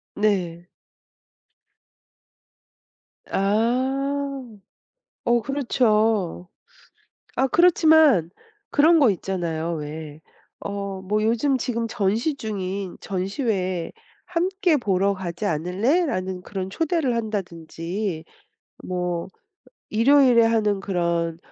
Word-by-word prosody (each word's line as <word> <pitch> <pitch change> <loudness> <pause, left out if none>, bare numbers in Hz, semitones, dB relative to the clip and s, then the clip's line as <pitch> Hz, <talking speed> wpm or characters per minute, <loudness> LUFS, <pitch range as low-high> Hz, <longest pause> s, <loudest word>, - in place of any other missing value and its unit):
네. 180 -5 0 2.6
아. 265 +7 0 0.8
어 240 0 +3
그렇죠. 220 - +1 0.9
아 265 - +2
그렇지만 315 - +5 0.4
그런 320 +2 +5
거 265 -6 +5
있잖아요, 170 -3 -3
왜. 150 0 -7 0.4
어 200 -1 -5
뭐 210 +3 -1
"요즘 235 +5 +2
지금 235 -1 -2
전시 225 +7 0
중인 195 -5 -4
전시회 190 - -2 0.3
함께 360 -1 +1
보러 200 -4 +1
가지 185 +1 -5
않을래?"라는 185 - 0
그런 190 -2 -5
초대를 320 - 0
한다든지 180 -4 -4 0.6
뭐 180 -1 -3 0.6
일요일에 245 +1 +5
하는 215 -3 +1
그런 170 -3 -1
205 Hz, 170 characters per minute, -23 LUFS, 180-260 Hz, 2.6 s, 그렇지만